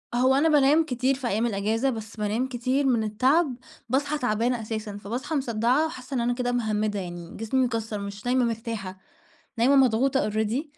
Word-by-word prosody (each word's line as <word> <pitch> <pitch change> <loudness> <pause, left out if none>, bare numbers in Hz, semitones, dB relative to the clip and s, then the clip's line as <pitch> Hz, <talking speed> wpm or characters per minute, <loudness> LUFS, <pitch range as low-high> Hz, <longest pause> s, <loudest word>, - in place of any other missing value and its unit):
هو 260 +2 +4
أنا 305 +4 +3
بانام 300 +2 +4
كتير 255 -1 0
في 260 -2 -4
أيام 225 +1 0
الإجازة، 225 +4 0
بس 220 -2 -6
بانام 215 +4 -1
كتير 260 +2 -1
من 240 -4 +2
التعب 260 +7 +2 0.3
باصحى 285 +3 0
تعبانة 240 -1 0
أساسًا، 215 -2 -5
فباصحى 250 +10 -4
مصدَّعة 250 +2 +1
وحاسّة 270 -4 -7
إن - - +1
أنا 245 +1 +1
كده 245 0 -1
مِهَمِّدة 215 -3 -1
يعني 175 -2 -7
جسمي 250 +4 +1
مكسَّر 225 -3 -3
مش 200 +1 -7
نايمة 250 0 +2
مرتاحة، 225 -5 -4 0.6
نايمة 270 +4 +4
مضغوطة 260 -1 +3
already، 220 +6 -1
240 Hz, 175 wpm, -26 LUFS, 215-265 Hz, 0.6 s, هو